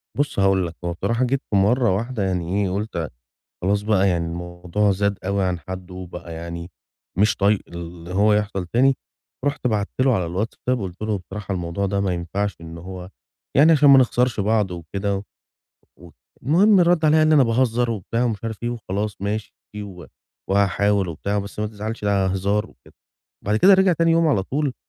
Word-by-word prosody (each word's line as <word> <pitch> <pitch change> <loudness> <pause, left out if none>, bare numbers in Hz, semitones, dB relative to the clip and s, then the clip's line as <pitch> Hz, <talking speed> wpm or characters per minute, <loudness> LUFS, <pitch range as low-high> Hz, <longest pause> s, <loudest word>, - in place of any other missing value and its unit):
بُص 145 -6 -1
هاقول 95 -2 +3
لك، 85 - -9
هو 85 - -1
بصراحة 115 +8 -1
جيت 135 +2 0
في 105 - 0
مرّة 105 +1 +3
واحدة 115 0 -2
يعني 95 +1 -1
إيه، 95 - 0
قُلت 95 -6 -3 0.5
خلاص 100 +2 +1
بقى 100 -2 +2
يعني 85 -2 0
الموضوع 85 +4 -1
زاد 100 0 0
أوي 100 0 0
عن 90 -2 -1
حدّه 90 +3 -8
وبقى 90 -2 -8
يعني 85 +2 -7 0.5
مش 100 -1 +3
طايق 100 +1 +2
اللي 85 0 -8
هو 105 +2 +4
يحصل 105 -3 -1
تاني، 130 +8 +3 0.5
رُحت 145 -3 0
بعت 105 -3 0
له 130 -2 +4
على 90 -4 -1
الWhatsapp 115 +6 -2
وقُلت 95 -4 -6
له: 110 -1 -1
"بصراحة 95 +3 -6
الموضوع 90 +2 -2
ده 100 0 -1
ما 95 -2 0
ينفعش 95 +4 -3
إن 80 0 -9
هو 90 +1 -8 0.5
يعني 155 +4 +7
عشان 145 -2 +6
ما 135 - +9
نخسرش 125 -2 +1
بعض 105 -1 +1
وكده 100 +4 -3 0.8
ود" 85 -3 -15 0.3
المهم 190 - +5
رَد 170 -2 +3
عليّا 155 +1 +5
قال 155 - +4
لي: - - +5
"أنا 140 - +6
باهزّر،" 120 0 +1
وبتاع 115 +3 -2
ومش 115 -3 -2
عارف 110 -2 -4
إيه 120 - 0
وخلاص 105 -3 -4
ماشي 105 +1 -3 0.3
و 90 -5 -10 0.4
وهاحاول 100 0 +2
وبتاع، 100 +5 -3
بس 100 +1 -7
ما 105 - -1
تزعلش 110 +1 -6
ده 100 -2 +2
هزار 100 +3 0
وكده. - - -22 0.5
بعد 105 +2 +1
كده 195 - +7
رجع 190 -1 +4
تاني 165 0 +2
يوم 165 0 +3
على 105 -11 +2
طول، 140 +3 -1
100 Hz, 190 wpm, -22 LUFS, 95-115 Hz, 0.8 s, ما